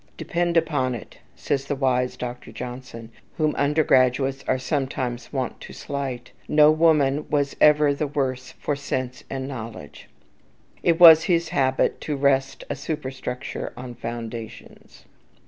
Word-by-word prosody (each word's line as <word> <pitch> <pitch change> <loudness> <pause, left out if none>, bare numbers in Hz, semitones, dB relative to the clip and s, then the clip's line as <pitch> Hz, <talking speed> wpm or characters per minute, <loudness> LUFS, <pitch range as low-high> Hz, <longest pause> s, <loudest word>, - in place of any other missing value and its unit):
"Depend 175 -1 -1
upon 145 -6 +1
it," 115 - -11 0.2
said 100 - -1
the 140 +1 -4
wise 125 -2 0
Dr. 125 0 -6
Johnson, 125 -2 -8 0.3
whom 155 -1 +1
undergraduates 135 -2 +2
are 130 - +2
sometimes 130 -3 -3
wont 130 -4 -3
to - - -10
slight, 135 -4 -5 0.2
"no 150 0 +6
woman 150 -3 +2
was 145 -2 0
ever 150 -1 +5
the 145 +1 -2
worse 130 -3 -3
for 145 - -3
sense 130 -3 -4
and 135 -1 -4
knowledge." 115 - -9 0.7
It 165 0 +2
was 165 -2 +9
his 170 -2 +1
habit 130 -1 +1
to 150 - -3
rest 135 -1 +1
a - - -3
superstructure 135 -3 -5
on 125 0 -7
foundations. 115 -1 -8
135 Hz, 135 wpm, -24 LUFS, 125-150 Hz, 0.7 s, was